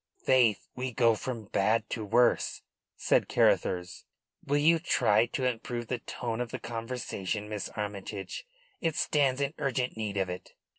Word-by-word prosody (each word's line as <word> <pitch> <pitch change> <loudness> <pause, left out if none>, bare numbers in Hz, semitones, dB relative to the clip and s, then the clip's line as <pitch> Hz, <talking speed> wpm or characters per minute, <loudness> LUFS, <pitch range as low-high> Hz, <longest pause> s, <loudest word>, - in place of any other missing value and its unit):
"Faith, 120 -7 +3
we 130 0 -3
go 115 -1 +4
from 115 0 -4
bad 110 +3 +1
to 110 - -4
worse," 120 +4 +2 0.3
said - - +2
Carruthers. 90 0 +1 0.4
"Will 145 - +1
you 165 +3 +5
try 115 -9 +3
to 130 +2 -2
improve 120 -1 -2
the 125 - -1
tone 120 -1 -4
of 120 - -3
the - - -4
conversation, 115 -4 -4
Miss 105 -2 -4
Armytage? 100 - -5 0.3
It 165 -2 0
stands 140 -5 +2
in 140 +2 0
urgent 130 -2 -1
need 105 -2 -3
of 95 -1 +1
it." 90 0 -7
115 Hz, 155 wpm, -30 LUFS, 105-130 Hz, 0.4 s, you